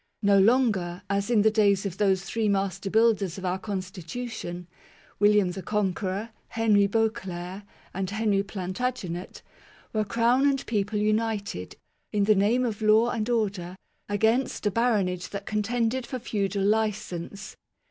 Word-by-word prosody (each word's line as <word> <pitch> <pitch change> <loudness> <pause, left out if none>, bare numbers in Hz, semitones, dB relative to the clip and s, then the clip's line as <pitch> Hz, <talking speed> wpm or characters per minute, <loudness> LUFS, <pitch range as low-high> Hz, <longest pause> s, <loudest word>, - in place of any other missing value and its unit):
No 200 -1 +5
longer, 200 -5 +2
as 200 +2 0
in 220 -4 +4
the 220 - +5
days 205 -2 +3
of 190 -2 -4
those 190 -2 +2
three 220 +1 -1
master 195 0 -1
builders 215 -4 +2
of 190 - -6
our 185 +1 -1
constitution, 185 -1 -5 0.5
William 205 -2 +4
the 190 - -6
Conqueror, 200 +1 -2 0.2
Henry 210 -3 +3
Beauclerc, 195 -4 -2 0.3
and 190 0 -2
Henry 210 -1 +1
Plantagenet, 190 -1 -4 0.5
were 215 -1 +1
Crown 235 +6 +3
and 270 -1 -1
people 210 -1 -1
united, 210 - -1 0.4
in 205 -1 +1
the 215 +2 +5
name 215 +6 +2
of 220 -3 -3
law 220 +2 +4
and 220 +1 -2
order, 200 -6 -1 0.3
against 220 +5 +1
a 205 - +2
baronage 195 -6 0
that 200 0 -6
contended 230 +3 -1
for 255 - -4
feudal 200 -4 -2
licence. 205 -3 -2
205 Hz, 140 wpm, -26 LUFS, 190-225 Hz, 0.5 s, No